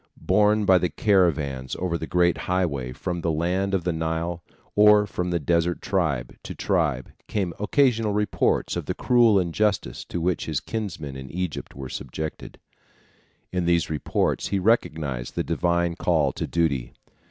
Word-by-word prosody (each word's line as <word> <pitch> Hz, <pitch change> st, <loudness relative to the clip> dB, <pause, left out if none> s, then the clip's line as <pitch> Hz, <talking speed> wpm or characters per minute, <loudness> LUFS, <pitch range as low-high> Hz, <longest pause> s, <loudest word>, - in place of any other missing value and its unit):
Borne 105 Hz, +2 st, +3 dB
by 95 Hz, -2 st, +6 dB
the 90 Hz, -, 0 dB
caravans 75 Hz, -, +1 dB
over 90 Hz, -2 st, -1 dB
the 80 Hz, -1 st, -4 dB
great 90 Hz, -1 st, +3 dB
highway 75 Hz, -9 st, 0 dB
from 85 Hz, +7 st, -4 dB
the 85 Hz, -, -1 dB
land 90 Hz, +5 st, 0 dB
of 90 Hz, -, -1 dB
the 90 Hz, 0 st, 0 dB
Nile 80 Hz, +1 st, -2 dB, 0.3 s
or 105 Hz, 0 st, +6 dB
from 90 Hz, -2 st, -3 dB
desert 85 Hz, +1 st, +1 dB
tribe 80 Hz, -11 st, -1 dB
to -, -, -8 dB
tribe 75 Hz, -9 st, 0 dB, 0.2 s
came 95 Hz, -5 st, -2 dB
occasional 115 Hz, -1 st, +2 dB
reports 105 Hz, 0 st, 0 dB
of -, -, -4 dB
the -, -, -2 dB
cruel 120 Hz, -5 st, +4 dB
injustice 90 Hz, -, -1 dB
to 85 Hz, -, -4 dB
which 85 Hz, -1 st, -1 dB
his -, -, -1 dB
kinsmen 90 Hz, -11 st, -5 dB
in 65 Hz, -1 st, -8 dB
Egypt 90 Hz, -3 st, -4 dB
were 65 Hz, -1 st, -6 dB
subjected. 75 Hz, +5 st, -6 dB, 0.9 s
In 90 Hz, -1 st, -1 dB
these 85 Hz, -2 st, +2 dB
reports 75 Hz, -3 st, 0 dB
he 100 Hz, -, 0 dB
recognized 80 Hz, -, 0 dB
the -, -, 0 dB
divine 85 Hz, +1 st, 0 dB
call 80 Hz, -6 st, +1 dB
to -, -, -4 dB
duty. 70 Hz, -8 st, 0 dB
85 Hz, 155 wpm, -24 LUFS, 80-95 Hz, 0.9 s, by